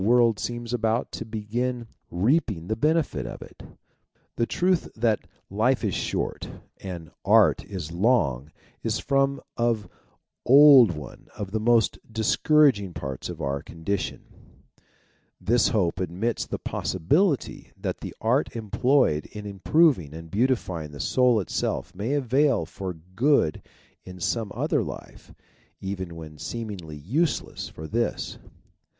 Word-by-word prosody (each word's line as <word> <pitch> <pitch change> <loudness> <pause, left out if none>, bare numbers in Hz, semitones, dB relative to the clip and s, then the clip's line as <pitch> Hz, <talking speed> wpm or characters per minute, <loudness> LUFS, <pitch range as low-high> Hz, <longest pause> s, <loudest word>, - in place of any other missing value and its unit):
world 115 0 +4
seems 120 0 -4
about 115 0 0
to - - -5
begin 115 +3 -3 0.2
reaping 105 - +1
the 110 - -1
benefit 150 - 0
of - - -7
it. - - -15 0.7
The 115 - 0
truth 180 -1 +1
that 110 -2 +2 0.3
life - - +1
is - - 0
short - - -3 0.3
and 85 -3 -8
art - - +5
is 90 -6 -6
long 85 - +1 0.3
is - - -1
from 135 0 +1 0.2
of 115 -3 0 0.6
old 135 -3 +8
one 75 -6 -10
of 100 -2 -5
the 110 - -1
most 115 0 +3
discouraging 110 - +3
parts 65 -2 -5
of - - -7
our 70 0 -1
condition; 85 +5 -4 1.2
this 115 +6 +2
250 - - +1
THEISM - - -5
hope 95 -5 +1
admits 95 +6 -2
the - - -3
possibility 145 - 0
that - - -4
the - - -7
art 125 +4 +1
employed 115 - +2
in 105 -1 -9
improving 100 - +2
and 80 0 -10
beautifying 100 - 0
the 70 - -9
soul 125 - +3
itself 95 - -2
may 105 +9 -2
avail 135 - +2
for 95 +2 -6 0.2
good 130 - +2 0.4
in 90 -1 -10
some 100 +4 -1
other - - +1
life, - - -8 0.5
even 95 -3 -5
when 75 -2 -10
seemingly 100 -10 -6
useless 140 - -1
for 80 - -9
this. 115 +8 -2
110 Hz, 135 wpm, -25 LUFS, 90-125 Hz, 1.2 s, old